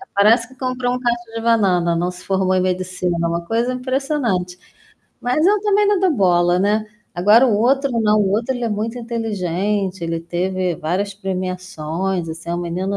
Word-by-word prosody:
Parece 225 +4 +4
que 260 - -18
comprou 255 -1 -1
um 250 - -2
cacho 240 -2 -2
de 225 - -3
banana, 185 -7 +2
não 175 +2 -1
se 180 0 -13
formou 190 -1 +1
em 185 - +2
medicina, 180 -1 -1
uma 170 0 -2
coisa 235 +5 0
impressionante. 250 -9 -1 0.6
Mas 250 +6 +1
eu 410 0 +3
também 415 0 +2
não 410 -2 +3
dou 375 -2 +3
bola, 175 -5 +3
né. 210 +2 +1 0.3
Agora, 210 +8 +5
o 215 -4 +2
outro 270 +5 +2
não. 215 0 +3
O 195 -2 +1
outro, 230 +5 0
ele 245 - -3
é 230 - 0
muito 220 +3 -3
inteligente, 200 -4 -2
ele 165 0 -2
teve 180 +1 -2
várias 190 +5 -2
premiações, 185 -2 -3
assim. 165 +1 -8
É - - 0
um - - -2
menino 185 +3 -2
200 Hz, 185 wpm, -20 LUFS, 180-240 Hz, 0.6 s, Agora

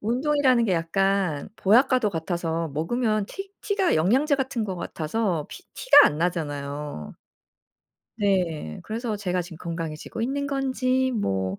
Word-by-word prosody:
운동이라는 255 +1 +2
게 195 - +1
약간 180 -1 0
보약과도 240 +1 +3
같아서 165 -1 -2
먹으면 215 - 0
티 390 - -8
티가 400 -3 +1
영양제 260 - +3
같은 265 -4 -2
것 190 -3 -4
같아서 170 0 -2
피 - - -10
티가 290 - +7
안 150 - -1
나잖아요. 145 - -3 1.0
네. 180 - -1
그래서 225 -1 -3
제가 185 -3 -1
지금 170 -2 -10
건강해지고 165 +3 -5
있는 280 +3 -1
건지 260 -1 0
뭐 95 - -1
195 Hz, 290 characters per minute, -25 LUFS, 165-255 Hz, 1.0 s, 티가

